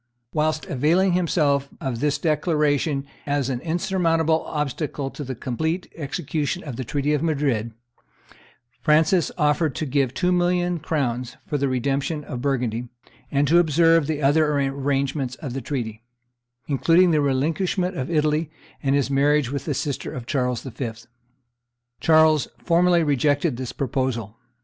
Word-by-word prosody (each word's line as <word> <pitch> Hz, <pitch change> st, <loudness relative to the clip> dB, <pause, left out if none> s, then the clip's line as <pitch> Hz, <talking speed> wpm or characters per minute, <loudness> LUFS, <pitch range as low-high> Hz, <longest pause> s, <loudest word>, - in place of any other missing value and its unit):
Whilst 155 Hz, 0 st, 0 dB
availing 165 Hz, +8 st, +2 dB
himself 150 Hz, -6 st, +1 dB
of 130 Hz, -4 st, -3 dB
this 145 Hz, +1 st, +1 dB
declaration 150 Hz, -3 st, +1 dB, 0.2 s
as 140 Hz, -2 st, 0 dB
an 125 Hz, -, -2 dB
insurmountable 165 Hz, -1 st, +1 dB
obstacle 145 Hz, -1 st, -3 dB
to 145 Hz, -, -7 dB
the 130 Hz, -1 st, -5 dB
complete 160 Hz, +10 st, -3 dB
execution 150 Hz, +2 st, -3 dB
of 140 Hz, -6 st, -6 dB
the 130 Hz, -, -4 dB
treaty 145 Hz, +4 st, -1 dB
of 150 Hz, -, +1 dB
Madrid, 140 Hz, -8 st, 0 dB, 1.1 s
Francis 160 Hz, +3 st, +3 dB
offered 150 Hz, -2 st, +1 dB
to 155 Hz, -, -2 dB
give 135 Hz, -2 st, 0 dB
two 180 Hz, 0 st, +1 dB
million 175 Hz, -1 st, +1 dB
crowns 125 Hz, -6 st, -2 dB
for 145 Hz, -, -2 dB
the 140 Hz, 0 st, +1 dB
redemption 140 Hz, +4 st, -1 dB
of 125 Hz, -3 st, -6 dB
Burgundy, 125 Hz, -4 st, -1 dB, 0.4 s
and 140 Hz, 0 st, +1 dB
to 170 Hz, +4 st, +5 dB
observe 165 Hz, -1 st, +4 dB
the 150 Hz, -2 st, -2 dB
other 150 Hz, +2 st, +4 dB
arrangements 135 Hz, -1 st, -1 dB
of 135 Hz, -5 st, -6 dB
the 135 Hz, -, -3 dB
treaty, 115 Hz, -4 st, -4 dB, 0.7 s
including 170 Hz, +5 st, +4 dB
the 155 Hz, -2 st, +3 dB
relinquishment 165 Hz, +7 st, 0 dB
of 130 Hz, -2 st, -3 dB
Italy 155 Hz, -1 st, +1 dB, 0.3 s
and 140 Hz, -1 st, +1 dB
his 140 Hz, -1 st, 0 dB
marriage 140 Hz, -1 st, +2 dB
with 140 Hz, -1 st, -4 dB
the 150 Hz, -, -1 dB
sister 140 Hz, 0 st, -3 dB
of 125 Hz, -2 st, -6 dB
Charles 125 Hz, -2 st, -1 dB
V. 125 Hz, -3 st, -5 dB, 1.1 s
Charles 155 Hz, -2 st, +4 dB
formally 175 Hz, 0 st, +3 dB
rejected 145 Hz, 0 st, +1 dB
this 125 Hz, 0 st, -5 dB
proposal. 130 Hz, -6 st, -2 dB
145 Hz, 145 wpm, -23 LUFS, 135-160 Hz, 1.1 s, to